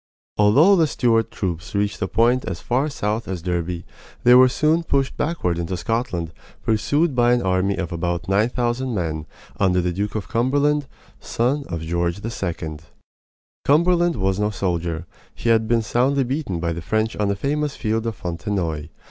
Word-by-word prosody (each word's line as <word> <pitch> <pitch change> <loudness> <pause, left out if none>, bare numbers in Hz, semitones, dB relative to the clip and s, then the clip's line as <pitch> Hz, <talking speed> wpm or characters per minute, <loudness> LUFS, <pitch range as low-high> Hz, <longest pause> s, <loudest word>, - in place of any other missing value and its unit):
Although 140 - +5
the 165 -2 +4
Stuart 115 -5 +1
troops 90 -1 -4
reached 100 0 -1
a 95 - 0
point 120 +4 +2
as - - -4
far 130 +5 0
south 110 -4 -2
as 90 -3 -4
Derby, 85 -1 -2 0.4
they 125 - +7
were 130 +1 +8
soon 155 +5 +2
pushed 140 -5 0
backward 90 - -1
into 85 +2 -3
Scotland, 90 -5 -2 0.3
pursued 145 +8 +1
by 120 -1 +4
an 120 - +1
army 95 +1 +1
of 90 -3 -4
about 85 +1 -2
nine 100 +4 +2
thousand 120 0 -1
men 80 -4 -3 0.3
under 90 -2 +3
the 90 0 0
Duke 105 +3 -3
of 105 - -3
Cumberland, 140 +4 +1 0.3
son 135 +5 -1
of 85 -2 -4
George 85 +2 -1
II. 85 -8 -4 0.9
Cumberland 175 +3 +3
was 95 -2 0
no 105 0 +1
soldier; 85 -4 -2 0.3
he 115 - -2
had 110 -1 +3
been 115 0 +2
soundly 135 +5 +2
beaten 130 - -2
by 85 0 -1
the 85 - -5
French 110 +6 -1
on 105 - +1
the 100 - 0
famous 145 +6 -1
field 115 0 -1
of 115 - -3
Fontenoy. 85 -3 -3
105 Hz, 175 wpm, -22 LUFS, 90-130 Hz, 0.9 s, were